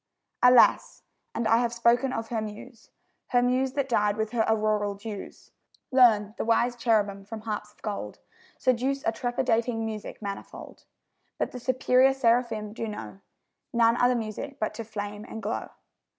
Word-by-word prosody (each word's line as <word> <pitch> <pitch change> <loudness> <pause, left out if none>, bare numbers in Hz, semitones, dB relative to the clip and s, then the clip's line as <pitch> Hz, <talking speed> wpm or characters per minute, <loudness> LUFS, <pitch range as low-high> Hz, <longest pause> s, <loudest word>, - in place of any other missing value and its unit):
Alas, 250 -1 +5 0.3
and 230 -1 0
I 225 - +5
have 240 -1 +1
spoken 240 +3 +3
of 225 -2 -4
her 225 -2 -1
Muse 215 +2 -9 0.4
Her 245 -1 +2
Muse, 255 +1 +1
that 280 -1 -1
died 210 -4 +1
with 220 0 -2
her 235 -2 +1
auroral 215 -2 +1
dews! 205 0 -9 0.4
Learn, 220 -5 +5
the - - 0
wise 235 +2 +2
cherubim 210 -4 +1
from 215 +2 -8
harps 210 -1 -5
of - - -31
gold 210 -2 -5 0.4
Seduce 260 +2 0
a - - +2
trepidating 230 -1 -1
music 215 -2 -6
manifold; 200 -2 -8 0.5
But - - -2
the 250 - -7
superior 255 +1 +3
seraphim 230 -4 +1
do 225 0 -4
know 210 -2 -7 0.5
None 230 -1 +4
other 245 +1 +3
music 235 +5 -5
but 215 - -1
to 230 - -6
flame 210 -1 -6
and 225 - -8
glow. - - -4
230 Hz, 160 wpm, -27 LUFS, 215-245 Hz, 0.5 s, Alas